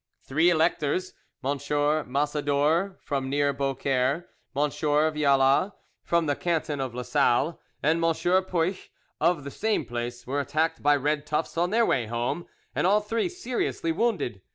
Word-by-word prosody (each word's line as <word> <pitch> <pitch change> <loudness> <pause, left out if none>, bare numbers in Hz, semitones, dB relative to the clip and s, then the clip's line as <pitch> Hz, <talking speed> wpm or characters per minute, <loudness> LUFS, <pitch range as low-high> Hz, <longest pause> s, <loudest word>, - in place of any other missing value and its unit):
Three 160 +6 +3
electors—M. 160 -3 -1
Massador 145 +4 0
from 135 -2 -2
near 145 0 +1
Beaucaire, 135 +3 0 0.3
M. 145 +1 +1
Vialla 150 +2 +2 0.3
from 170 -1 +1
the 145 -2 +1
canton 160 -3 -1
of 130 -3 -4
Lasalle, 125 +4 +1 0.2
and 160 +3 +2
M. 165 - +4
Puech 185 +1 0 0.3
of 170 -5 +2
the 140 - -6
same 215 -6 0
place 120 +1 -5
were 140 +3 -1
attacked 155 +3 0
by 145 0 +4
red 145 +1 -1
tufts 155 +1 -2
on 175 +2 +1
their 230 +3 +3
way 120 - +1
home, 120 +9 -2 0.3
and - - +1
all 205 +2 +4
three 225 +8 -1
seriously 255 - -2
wounded. 165 - -1
150 Hz, 140 wpm, -26 LUFS, 140-170 Hz, 0.3 s, M